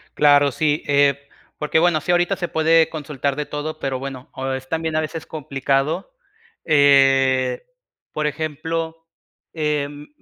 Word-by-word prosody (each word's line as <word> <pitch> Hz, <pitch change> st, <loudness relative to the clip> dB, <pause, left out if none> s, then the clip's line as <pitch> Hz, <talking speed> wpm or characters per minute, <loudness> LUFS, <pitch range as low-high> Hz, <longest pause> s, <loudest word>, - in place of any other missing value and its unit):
Claro, 145 Hz, -1 st, +5 dB
sí, 150 Hz, +3 st, 0 dB
eh, 140 Hz, -1 st, +3 dB, 0.4 s
porque, 150 Hz, +1 st, +1 dB
bueno, 165 Hz, -2 st, +2 dB
sí, 175 Hz, -, -1 dB
ahorita 175 Hz, +2 st, +2 dB
se 180 Hz, -2 st, -3 dB
puede 160 Hz, 0 st, +3 dB
consultar 145 Hz, -3 st, -3 dB
de 150 Hz, +1 st, -3 dB
todo, 150 Hz, +2 st, -5 dB
pero, 135 Hz, -2 st, -2 dB
bueno, 135 Hz, -1 st, -7 dB
o 135 Hz, 0 st, -4 dB
es 130 Hz, 0 st, -5 dB
también 160 Hz, -1 st, -2 dB
a 155 Hz, -, +2 dB
veces 155 Hz, +1 st, -5 dB
complicado, 140 Hz, -, -2 dB, 0.5 s
eh, 135 Hz, -, +4 dB, 0.5 s
por 155 Hz, 0 st, -1 dB
ejemplo, 160 Hz, +2 st, -4 dB, 0.5 s
em, 150 Hz, -2 st, -2 dB
150 Hz, 140 wpm, -21 LUFS, 140-160 Hz, 0.5 s, Claro